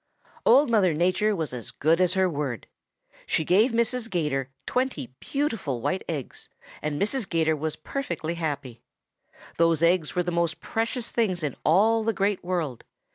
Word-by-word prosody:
"Old 280 -3 +6
Mother 190 -8 +3
Nature 185 +6 +2
was 160 -7 -3
as 120 -3 -6
good 165 +4 +2
as 180 0 +2
her 190 0 +3
word. 145 - -3 0.6
She 160 - +1
gave 205 - +4
Mrs. 235 0 0
'Gator 150 - -1 0.2
twenty 250 - -2
beautiful 225 - -2
white 185 +10 -1
eggs, 145 -6 -5 0.3
and 150 -1 -2
Mrs. 215 +2 0
'Gator 160 -2 +2
was 155 +1 -3
perfectly 170 - -4
happy. 145 -8 -4 0.8
Those 165 -1 +3
eggs 170 -2 +2
were 180 - +2
the 175 - -2
most 170 -1 0
precious 230 +1 -2
things 185 -8 0
in 145 -4 -2
all 220 +7 +4
the 225 +1 +1
Great 200 -1 0
World. 170 -9 -2
175 Hz, 160 wpm, -26 LUFS, 155-215 Hz, 0.8 s, Old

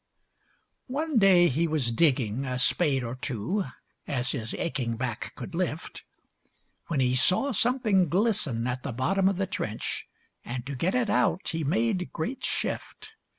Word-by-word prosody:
One 285 0 0
day 185 -3 +6
he 165 +4 +1
was 150 -7 0
digging, 125 -3 +2
a 130 -2 -2
spade 135 0 +2
or 115 0 -4
two, 130 - -2 0.4
As 125 -2 0
his 115 0 -3
aching 125 -9 -2
back 120 -1 -3
could 180 - -8
lift, 165 -2 -3 0.8
When 160 -5 -1
he 125 -1 +2
saw 185 - +4
something 220 - +2
glisten 180 - +1
at 125 0 -2
the 130 - -4
bottom 190 +11 +2
of 195 - -2
the 195 - 0
trench, 110 - -3 0.4
And 120 0 -5
to 140 - -5
get 170 - 0
it 240 -4 +1
out 185 - +1
he 165 -1 -2
made 185 +4 0
great 230 +12 -4
shift. 435 - -3
160 Hz, 155 wpm, -27 LUFS, 125-195 Hz, 0.8 s, day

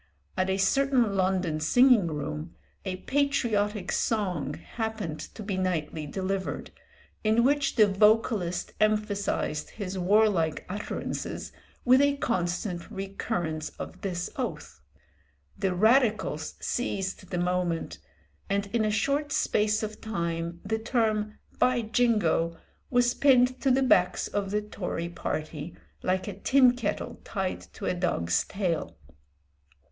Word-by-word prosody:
At 185 0 0
a 190 - +1
certain 245 +1 +2
London 185 -4 +1
singing 240 +4 +5
room 150 +1 -4 0.3
a 185 -1 -2
patriotic 215 -6 0
song 180 - 0
happened 220 -9 -4 0.2
to 215 - -7
be 195 -2 -2
nightly 165 -4 -2
delivered, 190 +3 -3 0.5
in 220 +2 +3
which 280 +1 +2
the 215 - +7
vocalist 205 -2 +2
emphasised 210 -7 0
his 195 -3 -5
warlike 185 -4 +2
utterances 205 +3 -4 0.3
with 255 +2 +6
a 285 0 +3
constant 180 -5 -2
recurrence 175 -5 -3
of - - -8
this 180 -3 -3
oath. 155 - -5 0.7
The 190 -2 -1
Radicals 215 - +2
seized 195 -6 -3
the 180 - -2
moment, 175 -1 -1 0.5
and 200 +1 +1
in 230 -2 +2
a 215 - +2
short 280 +8 0
space 215 +1 +1
of 215 0 -5
time 170 -5 -3
the 220 +2 -1
term 220 -2 0 0.2
"by 250 -2 +3
Jingo" 210 -8 +2 0.3
was 245 -1 +3
pinned 255 -2 +4
to 275 - +2
the 265 +1 +4
backs 180 -8 +3
of 200 -1 -2
the 210 +1 0
Tory 180 -5 -4
party 155 -1 -4 0.3
like 185 +2 0
a 205 - -3
tin 255 +1 +5
kettle 210 -4 -3
tied 190 -3 -3
to - - -7
a - - +1
dog's 170 - 0
tail. 165 - -2
200 Hz, 125 wpm, -28 LUFS, 175-225 Hz, 0.7 s, the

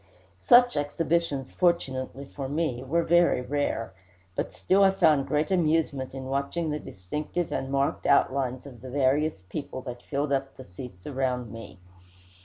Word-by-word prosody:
Such 245 - +6
exhibitions, 145 -1 -1
fortunately 140 -6 0
for 135 -1 -6
me, 145 -5 -1
were 165 +6 +1
very 175 -5 +4
rare; 130 -6 -2 0.4
but - - -2
still 195 +1 +3
I 195 - +7
found 160 -8 +3
great 150 +4 0
amusement 155 -7 +1
in 135 -1 -6
watching 140 +5 -1
the 150 - -2
distinctive 150 - -4
and 135 - -2
marked 140 0 0
outlines 130 -2 +2
of 125 -5 -11
the 130 - -8
various 140 -2 +1
people 130 +7 -6
that 125 -2 -7
filled 140 +1 -2
up 135 0 -2
the 130 - -10
seats 90 -1 -10
around 130 -4 -2
me. 115 -4 -10
140 Hz, 155 wpm, -27 LUFS, 130-155 Hz, 0.4 s, I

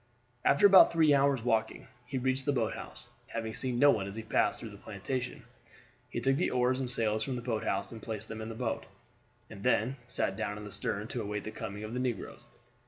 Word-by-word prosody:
After 140 +8 +5
about 195 -2 +9
three 160 -3 +5
hours' 140 -3 +3
walking 110 -2 0 0.2
he 135 - -3
reached 130 +1 0
the 145 - +3
boat 120 -5 0
house, - - -7 0.2
having 115 -1 -4
seen 125 0 -2
no 145 +3 +7
one 95 - -1
as 100 - -7
he 115 - -5
passed 110 - +1
through - - -7
the - - -11
plantation. 130 -2 -4 0.7
He - - -3
took 135 +3 +2
the 175 - +1
oars 125 +1 +2
and 130 -2 -2
sails 110 -3 +2
from 135 - -3
the 120 - -5
boathouse 110 -4 -1
and 115 -2 -8
placed 110 -1 -5
them 110 0 -6
in 110 - -5
the 115 - -6
boat, - - -3 0.6
and 100 -2 -10
then 120 +7 +2
sat 95 -5 0
down 105 -1 -3
in 105 - -8
the 105 - -8
stern - - -2
to - - -3
await 105 0 -3
the 110 - -5
coming 105 0 -6
of 110 +2 -6
the 125 - -1
negroes. 120 -1 -4
115 Hz, 230 wpm, -31 LUFS, 110-130 Hz, 0.7 s, about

